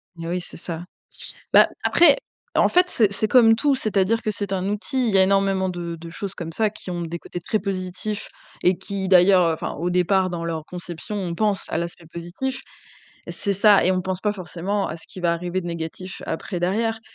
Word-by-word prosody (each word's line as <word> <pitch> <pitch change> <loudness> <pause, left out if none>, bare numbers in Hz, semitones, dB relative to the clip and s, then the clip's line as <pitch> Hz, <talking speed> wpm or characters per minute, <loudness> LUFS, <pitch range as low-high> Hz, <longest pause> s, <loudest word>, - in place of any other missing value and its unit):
Mais 165 -1 -7
oui, 180 +1 -1
c'est - - -7
ça. 170 0 -5 0.7
Bah - - +7
après, 310 -5 +6 0.4
en - - +4
fait, 360 +1 +4
c'est 215 - +2
c'est 215 +2 +1
comme 225 -1 +6
tout, 280 +4 +2
c'est-à-dire 215 -2 +1
que 215 - -1
c'est 205 -1 -4
un 190 -1 -1
outil. 235 +4 -1
Il 205 - -1
y - - +6
a 190 - +7
énormément 195 -1 +2
de 175 -2 -4
de 165 +1 -10
choses 195 +3 -6
comme 165 -1 -6
ça 215 +4 +1
qui 200 - -9
ont 175 -1 -3
des 170 +1 -4
côtés 175 - -7
très 215 +5 -1
positifs 190 +1 -3 0.3
et 180 0 +4
qui, 190 0 -4
d'ailleurs, 180 -2 +6
enfin, 160 - -4
au 175 +3 -1
départ, 185 +1 +2
dans 170 -1 -4
leur 165 -2 -3
conception, 175 +3 -7
on 180 -4 -3
pense 210 0 0
à - - -1
l'aspect 170 0 -5
positif. 175 +11 -4 0.7
C'est 200 -1 -2
ça 200 0 +5
et 185 - +4
on 185 - 0
ne - - +1
pense 185 0 -3
pas 210 0 +1
forcément 195 +1 -3
à - - -4
ce 165 - -12
qui 195 - -9
va 170 -1 +2
arriver 175 +2 -2
de 175 - -7
négatif 170 +2 -6
après, 175 +2 -4
derrière, 225 +5 0
185 Hz, 220 wpm, -23 LUFS, 175-210 Hz, 0.7 s, Bah